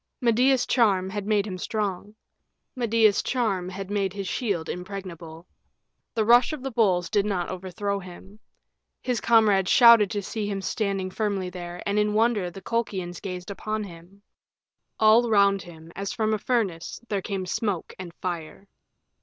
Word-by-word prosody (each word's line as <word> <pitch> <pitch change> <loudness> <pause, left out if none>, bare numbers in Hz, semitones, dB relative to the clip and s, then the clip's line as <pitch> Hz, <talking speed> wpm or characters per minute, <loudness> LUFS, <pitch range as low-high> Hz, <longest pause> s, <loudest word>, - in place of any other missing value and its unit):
Medea's 250 +1 +3
charm 195 -6 +2
had 205 0 -4
made 210 -2 +2
him 185 -3 -6
strong; 205 0 -3 0.6
Medea's 225 -4 +3
charm 200 -8 -1
had 195 +1 -7
made 195 -2 0
his 200 -2 -5
shield 190 -10 -2
impregnable. 180 -3 -7 0.7
The 220 -2 +1
rush 240 +6 +5
of 290 -4 -6
the 270 - -3
bulls 190 -7 +2
did 205 +2 +1
not 195 -4 -2
overthrow 190 +2 -3
him. 190 +2 -12 0.6
His 250 -3 -1
comrades 210 -5 +4
shouted 235 -4 +7
to 205 0 -3
see 210 +1 -4
him 200 -1 -2
standing 195 -2 -2
firmly 195 -3 -2
there, 175 -1 -7
and 205 +1 +1
in 210 0 +1
wonder 215 -4 +2
the 190 +3 -11
Colchians 190 -7 -3
gazed 180 0 -6
upon 215 +2 -3
him. 185 +2 -13 0.8
All 225 +2 +5
round 200 -2 +4
him, 165 -1 -13
as 195 +1 -4
from 220 -1 0
a 215 - 0
furnace, 200 -9 -2
there 200 -3 -1
came 195 -1 -4
smoke 195 -2 -2
and 180 -2 -7
fire. 175 +1 -6
200 Hz, 160 wpm, -25 LUFS, 185-220 Hz, 0.8 s, shouted